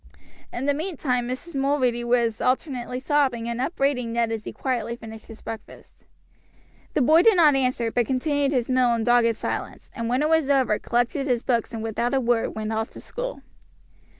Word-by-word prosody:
In 245 - -4
the 285 - +3
meantime 280 -7 -2
Mrs. 265 +7 -5
Mulready 270 -3 +1
was 235 -2 +1
alternately 255 -1 -1
sobbing 265 -4 +1
and 235 +1 -2
upbraiding 270 -5 0
Ned 230 -1 +1
as 220 -1 -4
he - - -5
quietly 240 -3 -2
finished 225 -2 -11
his 225 - -12
breakfast. 220 -2 -10 0.9
The 285 - +3
boy 315 +6 +6
did 445 +2 +5
not 315 -4 +6
answer, 255 -3 0
but 240 -2 +1
continued 285 +1 0
his 250 -4 0
meal 255 -2 +3
in 230 - -1
dogged 235 -1 +3
silence, - - -5
and 230 -2 -3
when 255 +4 +1
it 305 - +1
was 320 -3 +2
over 260 -6 +3
collected 245 +4 0
his 245 -2 0
books 235 -2 0
and 225 -2 -5
without 235 +3 -1
a - - +3
word 240 -2 0
went 220 0 -3
off 220 +1 -2
to - - -10
school. - - -6
250 Hz, 190 wpm, -24 LUFS, 235-275 Hz, 0.9 s, boy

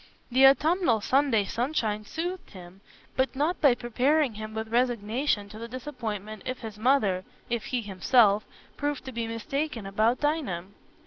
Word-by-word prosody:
The 265 +2 +7
autumnal 300 - +3
Sunday 255 -2 +2
sunshine 220 -2 -1
soothed 350 - -4
him, 185 0 -12 0.3
but 265 +1 0
not 305 +6 0
by 280 -6 +6
preparing 260 +3 +1
him 215 +1 -7
with 220 0 -4
resignation 235 -1 0
to 215 +1 -10
the 230 - -6
disappointment 220 -5 -6
if 255 0 -5
his 220 -3 -8
mother—if 220 -2 0
he 245 -2 -2
himself—proved 215 +7 +1
to 260 - -6
be 230 -2 -3
mistaken 230 +1 -3
about 215 +5 +1
Dinah. 290 - -1
235 Hz, 140 wpm, -27 LUFS, 215-275 Hz, 0.3 s, The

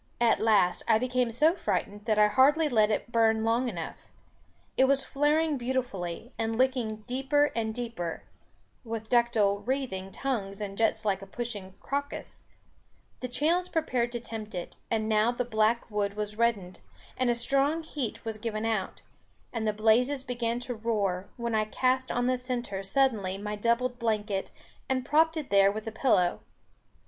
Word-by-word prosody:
At 235 -1 +3
last, 205 -5 +3
I 220 - +5
became 250 0 0
so 300 +9 +3
frightened, 205 - -2
that 215 -2 +1
I 210 - +7
hardly 290 +8 +4
let 215 -6 +3
it 220 +2 -2
burn 225 -1 +3
long 235 +3 +2
enough. 170 -7 -7 0.7
It 265 - +5
was 275 0 +2
flaring 295 +1 +1
beautifully, 240 -5 -3
and 225 0 -1
licking 245 -4 0
deeper 270 +4 +1
and 220 -1 -1
deeper 220 -8 -4 0.6
(with 225 -2 -6
ductile 225 -5 +3
wreathing 205 -5 -3
tongues 205 -7 -3
and 200 -2 -5
jets 225 0 +1
like 195 -2 +1
a 195 - -9
pushing 205 -6 -6
crocus), 285 +1 -4 0.7
the 255 - -4
channels 325 +9 +1
prepared 250 -7 0
to 240 - -2
tempt 220 -3 -7
it; 175 - -6
and 220 -1 0
now 215 +1 +3
the 245 0 -2
black 220 0 +1
wood 205 -1 -1
was 210 0 -4
reddened, 210 -6 0 0.4
and 255 -1 +1
a 240 - +3
strong 275 +6 +1
heat 280 -9 -5
was 220 -1 -4
given 215 0 -3
out, 220 -4 -2 0.5
and 225 -2 -1
the - - +3
blazes 235 +6 +2
began 240 -2 -2
to 245 0 -4
roar; 205 -5 -1
when 235 -1 -2
I 215 -1 +2
cast 255 +4 0
on 245 0 0
the 255 0 +1
centre 240 -6 -3
suddenly 195 -3 +1
my 210 +1 -4
doubled 235 +3 0
blanket, 215 -4 -1 0.4
and 255 -1 0
propped 320 +2 +3
it 300 -7 -5
there 195 0 +6
with 215 +1 -6
the 225 - -4
pillow. 215 -7 +2
230 Hz, 170 wpm, -28 LUFS, 210-255 Hz, 0.7 s, I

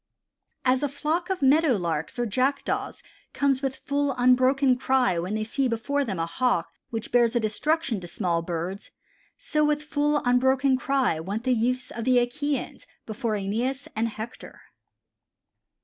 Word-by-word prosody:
"As 255 0 +3
a 290 - 0
flock 310 +6 -2
of 375 -5 -2
Meadow 290 +1 +5
Larks 165 -2 -3
or 240 - 0
Jackdaws 260 +6 -1 0.3
comes 275 -2 +1
with 270 -1 -2
full, 285 -1 -1
unbroken 255 +2 +4
cry 250 -7 +1
when 185 +5 -3
they 215 - -1
see 260 +5 0
before 265 +5 -1
them 205 -8 -3
a 165 - 0
Hawk 250 +9 0 0.2
which 225 -2 -5
bears 240 -2 +4
destruction 240 +3 0
to 175 - -8
small 175 -1 -1
birds, 175 +4 -5 0.5
so 305 -11 0
with 300 0 +1
full, 295 0 +1
unbroken 260 +2 +3
cry 260 -9 0
went 200 +7 -4
the 255 0 +2
youths 250 +2 -1
of 230 - -5
the 255 0 +3
Achæans 285 +4 -2 0.2
before 220 +1 -3
Æneas 230 +7 -2
and 225 +1 +1
Hector." 225 +1 -8
250 Hz, 155 wpm, -26 LUFS, 220-275 Hz, 0.5 s, Meadow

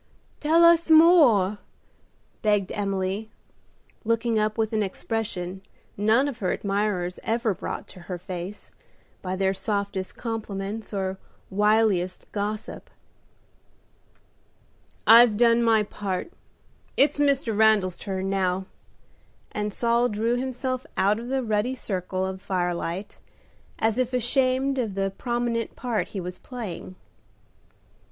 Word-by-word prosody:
"Tell 320 +3 +4
us 335 0 +5
more;" 290 - +6 0.8
begged 205 -3 +1
Emily, 195 +1 -2 0.7
looking 230 0 +1
up 215 +1 0
with 220 0 0
an 215 - +1
expression 195 -2 -3 0.3
none 220 +7 +3
of 260 -4 -5
her 185 -3 0
admirers 195 -3 -1
ever 225 -1 0
brought - - -6
to - - -12
her 180 - -3
face 180 +2 -7 0.5
by 185 0 -3
their 190 0 +1
softest 200 -2 -3
compliments 215 -2 -5
or 190 -2 -3 0.3
wiliest 205 -3 +2
gossip. 210 +1 -4 2.2
"I've 230 -1 +8
done 235 0 +4
my 225 -2 +4
part. 200 - -4 0.7
It's 285 +2 +3
Mr. 275 -6 +2
Randal's 210 -4 +4
turn 190 -1 -4
now;" 190 -1 0 0.9
and 210 0 -2
Saul 235 +3 +2
drew 225 +3 0
himself 255 0 -2
out 205 +3 +3
of 235 - -7
the 265 0 -1
ruddy 220 +3 0
circle 185 -4 -3
of 190 0 -5
firelight, 180 +1 -3 0.6
as 225 +2 +1
if 255 0 0
ashamed 260 +2 +1
of 220 -6 -2
the 195 0 -1
prominent 240 -2 -2
part 240 -5 -2
he 200 - -6
was 180 0 -6
playing. 215 -7 -7
215 Hz, 120 wpm, -25 LUFS, 190-235 Hz, 2.2 s, I've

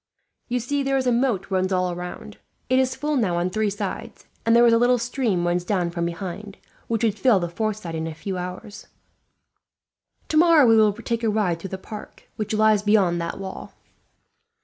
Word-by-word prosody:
You 250 0 -1
see 280 +4 -1
there 270 0 +1
is 260 - -1
a 250 - +3
moat 235 -6 0
runs 185 0 0
all 180 -1 0
round. 180 0 -8 0.3
It 260 - +5
is 260 0 +1
full 300 0 -2
now 195 -8 +1
on 175 +1 -1
three 215 +1 0
sides, 205 +3 -6 0.2
and 230 - +5
there 235 0 +6
is 235 - +5
a 230 - +4
little 245 +1 +4
stream 235 -7 -1
runs 175 0 0
down 175 -2 -1
from 170 0 -2
behind, 195 +4 -6 0.3
which 230 -1 -1
would 215 -2 +1
fill 245 -7 +4
the 175 - -2
fourth 215 +4 -2
side 170 -6 -7
in 160 0 -3
a 160 - -6
few 190 +4 -5
hours. 180 +3 -7 1.4
"Tomorrow 320 -2 +5
we 225 -1 +6
will 215 -1 +5
take 230 +3 -4
a 225 - +2
ride 205 -6 0
through 195 - -7
the 190 - -5
park, 210 +2 -10
which 215 - -4
lies 215 -1 +4
beyond 200 -5 +2
that 170 - -4
wall." 190 -1 -8
210 Hz, 205 wpm, -23 LUFS, 180-235 Hz, 1.4 s, there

